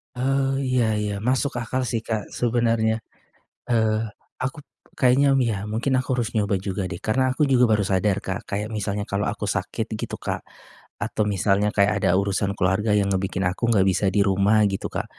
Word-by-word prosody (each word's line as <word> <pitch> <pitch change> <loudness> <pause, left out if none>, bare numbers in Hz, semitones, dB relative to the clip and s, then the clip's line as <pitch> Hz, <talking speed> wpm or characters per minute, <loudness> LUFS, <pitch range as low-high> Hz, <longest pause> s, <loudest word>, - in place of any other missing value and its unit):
Oh 135 +1 0
iya 130 -3 +1 0.2
iya. 105 -1 -2
Masuk 130 +2 +1
akal 125 +1 -2
sih, 115 -2 -2
Kak, 110 -2 -3
sebenernya. 115 -2 +1 0.7
Eee, 110 -1 +1 0.3
akup 135 +3 -4 0.3
kayaknya 135 +2 +4
ya 115 -6 +1
mungkin 120 +5 -1
aku - - -13
harus 120 0 -2
nyoba 100 -3 +1
juga 95 0 -3
deh, 85 - -5
karena 130 +7 +1
aku 145 +3 +1
juga 125 -3 +4
baru 105 -2 +2
sadar, 95 +1 +1
Kak, 95 0 -2
kayak 105 +2 -2
misalnya 105 0 -2
kalau 100 -1 -1
aku - - -4
sakit - - -2
gitu, - - -4
Kak, - - -4 0.6
atau 110 - -1
misalnya 100 +1 +2
kayak 100 0 +3
ada 90 - +3
urusan 100 0 0
keluarga 95 +4 +1
yang 100 -1 +1
ngebikin 95 0 -1
aku 100 +6 0
enggak 100 -4 +4
bisa 100 - 0
di 100 - +4
rumah, 100 +2 +3
gitu, 95 - -3
Kak. - - -3
110 Hz, 180 wpm, -23 LUFS, 100-125 Hz, 0.7 s, kayaknya